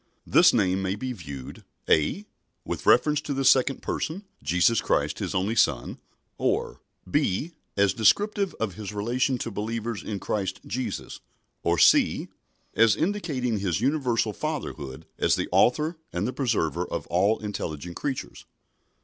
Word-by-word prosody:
This - - +6
name 95 0 +1
may 95 0 -1
be 125 +4 -4
viewed 70 - -9 0.2
(a) 80 - +2 0.4
with - - -5
reference 150 -1 +4
to 145 -2 -4
the 135 0 -1
second 135 0 +4
Person, 180 +6 -3 0.2
Jesus 90 +9 +3
Christ - - 0
His - - -3
only 95 +4 +1
Son, - - +1 0.4
or - - -1 0.3
(b) 140 - 0 0.3
as 100 -1 +3
descriptive 200 - +2
of 110 -4 -3
His 105 +2 -7
relation 125 +5 0
to 115 - -4
believers 110 0 -3
in 105 -2 -4
Christ 95 -1 -3
Jesus, 120 -2 -4 0.4
or 85 0 +1
(c) - - +4 0.4
as 115 -3 +5
indicating 140 - -1
His 95 -3 -1
universal 125 -4 +1
Fatherhood 80 - -5
as - - +3
the - - -2
Author 155 +7 +3
and 90 +3 -2
the 125 - -3
Preserver 115 - 0
of - - -4
all 100 +6 +2
intelligent 85 -5 -5
creatures. 135 -3 -5
110 Hz, 145 wpm, -26 LUFS, 95-135 Hz, 0.4 s, This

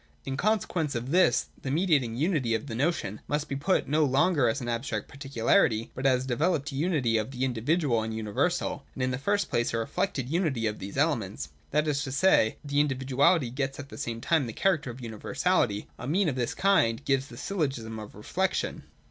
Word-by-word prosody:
In 135 - -3
consequence 180 - 0
of 120 +3 -3
this, 180 +2 +3
the 135 - -4
mediating 145 -7 +2
unity 140 -5 +1
of 110 - -3
the 125 - -6
notion 115 - -1
must 150 0 -1
be 140 - -3
put 155 +8 +1
no 155 +2 +3
longer 140 -1 +3
as 115 - -1
an 120 - -5
abstract 115 -3 -2
particularity, 135 - +1
but 135 +1 0
as 130 -1 +2
a - - -8
developed 150 +3 0
unity 140 -6 +1
of 110 +1 -2
the 130 -1 -2
individual 130 +1 +1
and 110 0 -3
universal 110 - -1
— - - -33
and 130 - -2
in 130 - +1
the 125 - -2
first 200 +7 0
place 115 -1 +1
a - - +1
reflected 125 - -2
unity 150 -7 0
of 105 -1 -2
these 100 +5 -7
elements. 110 - 0 0.2
That 150 +1 +1
is 145 -1 +1
to 140 -2 -4
say, 135 -7 +3
the 145 0 0
individuality 135 +1 +2
gets 135 +1 -2
at 140 -1 -8
the - - -9
same 115 -6 -4
time 160 -3 +2
the 115 - -6
character 160 - +1
of 120 +2 -8
universality. 115 - 0
A 125 - -6
mean 180 +6 +2
of 135 - -3
this 125 -2 -2
kind 140 -11 +2
gives 135 0 +1
the - - -12
Syllogism 135 - -3
of 105 -1 -10
Reflection. 185 - -2
135 Hz, 205 wpm, -28 LUFS, 115-155 Hz, 0.2 s, this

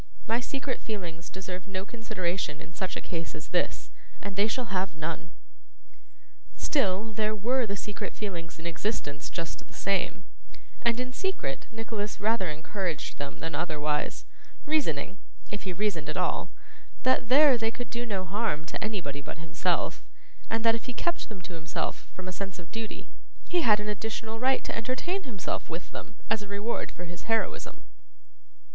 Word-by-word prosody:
My 230 +2 +3
secret 270 +1 -1
feelings 175 -6 -4
deserve 185 0 -5
no 190 -1 -2
consideration 185 -9 -1
in 165 - -10
such 185 +1 -1
a - - -2
case 165 -2 -3
as 155 - -7
this, 175 - +1 0.3
and 200 -1 -4
they 200 +2 +5
shall 230 -2 -1
have 185 -2 +1
none.' 160 +1 -2 1.3
Still, 215 -5 +2
there 215 0 +2
were 240 +4 +3
the 200 - 0
secret 205 +1 -3
feelings 170 -5 -3
in 160 - -9
existence 165 - -1
just 165 -2 -4
the - - -15
same, 195 -2 +1 0.6
and 235 0 +4
in 255 0 -1
secret 385 +7 -1
Nicholas 220 -2 -2
rather 215 -4 +3
encouraged 170 +2 -2
them 140 -1 -3
than 165 0 -2
otherwise; 150 -1 +1 0.4
reasoning 195 - +2 0.3
(if 205 -1 -3
he 190 - 0
reasoned 175 -5 +1
at 155 - -1
all) - - +2 0.5
that 255 -2 +4
there 280 +1 +9
they 225 -1 +2
could 240 -1 -5
do 235 0 0
no 200 -5 0
harm 190 -5 +1
to - - -2
anybody 180 -10 -1
but - - -6
himself, 165 0 +1 0.5
and 225 0 +2
that 225 - +8
if 230 - -2
he 250 - -1
kept 340 +4 0
them 195 -5 -7
to 175 - -6
himself 165 -1 -2
from 185 0 -6
a - - -1
sense 195 0 -3
of 170 -3 -10
duty, 225 -1 -4 0.4
he 350 - +5
had 210 -7 +7
an 210 - -2
additional 220 +2 -2
right 260 +2 +4
to - - -2
entertain 255 - 0
himself 215 -8 -2
with 170 +2 -4
them 210 - -7
as 220 -1 +3
a 205 - -6
reward 205 +4 -1
for 180 - -6
his 175 +5 -8
heroism. 225 -1 +1
200 Hz, 175 wpm, -30 LUFS, 175-225 Hz, 1.3 s, there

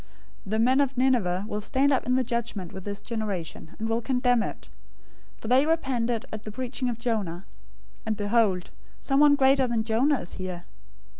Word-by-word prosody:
012:041 - - -27 0.4
The 220 - +1
men 255 +4 +4
of 275 -2 -1
Nineveh 215 -8 +2
will 210 -1 -3
stand 270 +6 +2
up 260 - 0
in 250 - +3
the 260 - +2
judgment 235 -7 -3
with 190 - -8
this 200 -1 -5
generation, 200 -9 -4
and 220 - -3
will 225 +1 0
condemn 250 -1 +2
it, - - -6 0.7
for - - -9
they 255 +4 +5
repented 250 -8 0
at 215 - -5
the 215 - -7
preaching 255 +2 -3
of 235 - -3
Jonah; 205 -7 -2 0.6
and 220 -1 -2
behold, 205 -3 +1 0.3
someone 285 +1 +4
greater 270 -1 +4
than 230 -2 0
Jonah 245 +5 +2
is 175 - -8
here. 185 -2 -6
235 Hz, 180 wpm, -26 LUFS, 210-260 Hz, 0.7 s, they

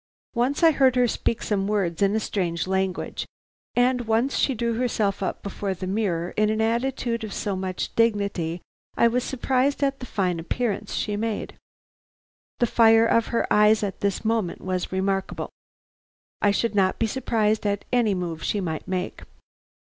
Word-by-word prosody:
Once 260 +7 0
I 325 - +8
heard 265 -4 +3
her 250 -1 +4
speak 230 0 -1
some 195 -2 0
words 195 -5 -1
in 200 +1 +3
a - - +2
strange 175 -6 -2
language, 190 0 -2 0.5
and 250 +1 +3
once 230 +5 +1
she 270 - +1
drew 235 0 -1
herself 220 -4 0
up 190 - -3
before 200 -1 -3
the 185 - -6
mirror 185 -4 -1
in 215 0 +1
an 215 0 0
attitude 235 +1 0
of 215 - -5
so 200 -1 -2
much 185 -1 -3
dignity 200 -7 0 0.3
I 235 - +5
was 245 +1 0
surprised 265 +2 0
at 275 -1 0
the 250 - -7
fine 180 -6 -1
appearance 210 +6 -2
she 210 - -1
made. 220 0 -3 1.0
The 240 - +3
fire 225 -1 +5
of 230 0 +2
her 235 - 0
eyes 210 +1 +5
at 200 -2 -3
this 200 +1 -1
moment 220 -5 0
was 185 -1 -2
remarkable. 195 0 -2 0.9
I 205 - +4
should 220 +3 +1
not 190 -2 +2
be 230 - +1
surprised 220 -2 0
at 205 0 -1
any 230 -5 +3
move 170 -3 -4
she 205 - -1
might 160 -5 -4
make. 185 -1 -3
215 Hz, 170 wpm, -25 LUFS, 190-235 Hz, 1.0 s, I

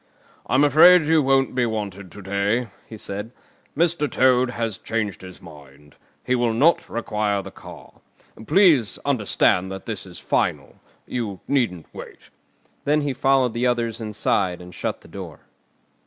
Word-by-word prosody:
"I'm 130 +3 +3
afraid 160 +4 +7
you 160 0 +3
won't 135 -1 +2
be 125 -2 +1
wanted 100 -4 -5
to 100 - -11
day," 100 +5 -1 0.2
he 110 - -10
said. 105 +2 -5 0.5
"Mr. 165 -3 +1
Toad 130 -1 +3
has 115 -5 -4
changed 110 -4 -3
his 95 -1 -11
mind. 75 -3 -15 0.3
He 125 - -1
will 120 -2 +1
not 150 +9 +2
require 105 -3 -2
the - - -9
car. - - -14 0.5
Please 165 - +4
understand 105 -7 +1
that 95 0 -8
this 105 -4 -5
is 90 -2 -11
final. - - -2 0.3
You 110 -6 -4
needn't 115 - 0
wait." - - -12 0.5
Then 150 +1 +2
he 145 -2 -2
followed 130 -2 +2
the 120 +2 0
others 120 -2 -1
inside 100 -4 -1
and 90 0 -12
shut - - -4
the - - -17
door. - - -9
115 Hz, 155 wpm, -22 LUFS, 100-135 Hz, 0.5 s, afraid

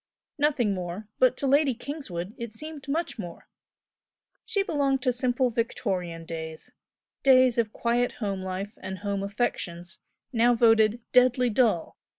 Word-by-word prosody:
Nothing 270 -8 +2
more, 180 +3 -5
but 255 0 +4
to - - -2
Lady 275 -1 +3
Kingswood 220 - -6
it 235 -2 -6
seemed 305 +1 -8
much 310 -3 -2
more. 175 -4 -8 1.0
She 435 -3 0
belonged 280 -7 0
to 250 -3 +2
simple 250 0 +1
Victorian 185 -7 -2
days 160 -1 -7 0.5
days 255 -3 +5
of 220 -2 +1
quiet 240 +2 0
home 200 -4 -3
life 190 +3 -4
and 190 0 -6
home 200 -1 -1
affections, 190 -4 -3 0.3
now 240 +1 +4
voted 225 0 +4
"deadly 250 -1 +4
dull!" 215 -7 +1
235 Hz, 140 wpm, -27 LUFS, 195-255 Hz, 1.0 s, days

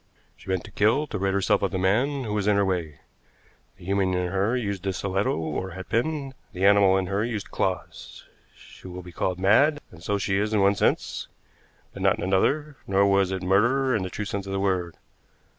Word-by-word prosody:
She - - -14
meant 95 -2 0
to - - -12
kill, 115 +9 +2
to 110 -9 -5
rid 95 0 0
herself 100 0 +2
of 100 - +1
the 95 - -3
man 125 +10 +1
who 105 -3 -4
was 105 -1 -1
in 105 - +4
her 100 0 +3
way. 85 -6 -3 0.8
The 90 - -14
human 95 -1 +1
in 90 -1 -1
her 100 +6 +1
used 100 -5 -3
the 95 0 -2
stiletto 95 -2 -1
or 80 +4 -4
hatpin, 135 +8 -2 0.2
the 95 +2 -1
animal 100 -1 +5
in 95 - 0
her 100 +3 -1
used 110 -4 -4
claws. 95 -1 -4 0.3
She - - -14
will 90 0 -8
be 90 - -11
called 90 +1 -2
mad, 140 +11 +4
and 85 - -14
so 100 +4 -1
she 95 0 0
is 105 +1 0
in 105 - +3
one 100 +1 +4
sense, - - -1 0.7
but - - -8
not - - +3
in - - -5
another; 140 +11 +1
nor 100 +1 +3
was 100 -1 +2
it 95 -1 -3
murder 120 +8 +2
in 105 - 0
the 95 - -3
true 105 - -5
sense 100 -1 -4
of 95 - -4
the 95 - -1
word. 90 -3 -1
100 Hz, 220 wpm, -25 LUFS, 95-105 Hz, 0.8 s, animal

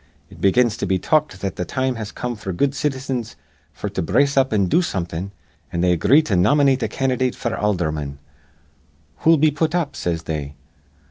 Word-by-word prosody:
It - - -14
begins 115 +3 +3
to 100 - -2
be 95 +1 +2
talked 150 - 0
that 95 -2 -3
th' 90 - -3
time 130 0 -1
has 110 -3 -6
come 125 -1 -4
f'r 95 -5 -6
good 140 -1 +2
citizens 130 -5 -3 0.4
f'r 105 -1 -4
to 95 - -1
brace 140 - +2
up 135 -1 +3
an' 100 -3 +2
do 130 - +3
somethin', 90 - -3 0.4
an' 85 -2 -1
they 90 0 +3
agree 105 - +4
to 115 - -2
nomynate 135 +8 +3
a - - +1
candydate 130 -1 0
f'r 120 - -3
aldherman. 80 -8 -1 1.0
'Who'll 165 0 +4
we 155 +1 +4
put 155 +3 -1
up?' 150 -5 -1
says 85 -2 -2
they. 75 -3 -4
110 Hz, 190 wpm, -21 LUFS, 90-135 Hz, 1.0 s, agree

